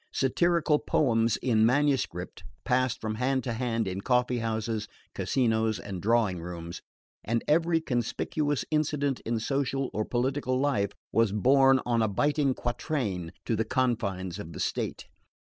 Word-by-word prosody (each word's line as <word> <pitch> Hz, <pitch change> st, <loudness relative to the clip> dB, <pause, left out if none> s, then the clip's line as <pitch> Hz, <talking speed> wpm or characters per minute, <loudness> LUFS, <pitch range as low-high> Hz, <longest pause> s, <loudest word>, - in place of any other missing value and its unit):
Satirical 155 Hz, +2 st, +2 dB
poems 115 Hz, -5 st, +2 dB
in 110 Hz, -4 st, +3 dB
manuscript 125 Hz, -9 st, +1 dB, 0.2 s
passed 130 Hz, 0 st, +1 dB
from 110 Hz, -1 st, -3 dB
hand 130 Hz, 0 st, +1 dB
to 120 Hz, -, -2 dB
hand 115 Hz, -2 st, -1 dB
in 95 Hz, +1 st, -3 dB
coffee 125 Hz, +1 st, +1 dB
houses, 110 Hz, -1 st, -2 dB, 0.3 s
casinos 110 Hz, -3 st, +1 dB
and 95 Hz, -3 st, -6 dB
drawing 105 Hz, -5 st, +2 dB
rooms, 85 Hz, 0 st, -7 dB, 0.4 s
and 115 Hz, +1 st, -1 dB
every 165 Hz, +2 st, +3 dB
conspicuous 145 Hz, +2 st, -1 dB
incident 145 Hz, -3 st, 0 dB
in 115 Hz, -1 st, 0 dB
social 135 Hz, +2 st, -1 dB
or 110 Hz, -, 0 dB
political 130 Hz, +2 st, -1 dB
life 130 Hz, -8 st, +1 dB, 0.2 s
was 115 Hz, -1 st, +3 dB
borne 135 Hz, +5 st, +5 dB
on 120 Hz, -1 st, +1 dB
a 110 Hz, -, +3 dB
biting 140 Hz, +5 st, +1 dB
quatrain 115 Hz, -, -2 dB
to 115 Hz, -, 0 dB
the 110 Hz, -, +1 dB
confines 105 Hz, -7 st, -1 dB
of 85 Hz, -4 st, -8 dB
the -, -, -8 dB
state. -, -, -2 dB
120 Hz, 145 wpm, -28 LUFS, 110-135 Hz, 0.4 s, borne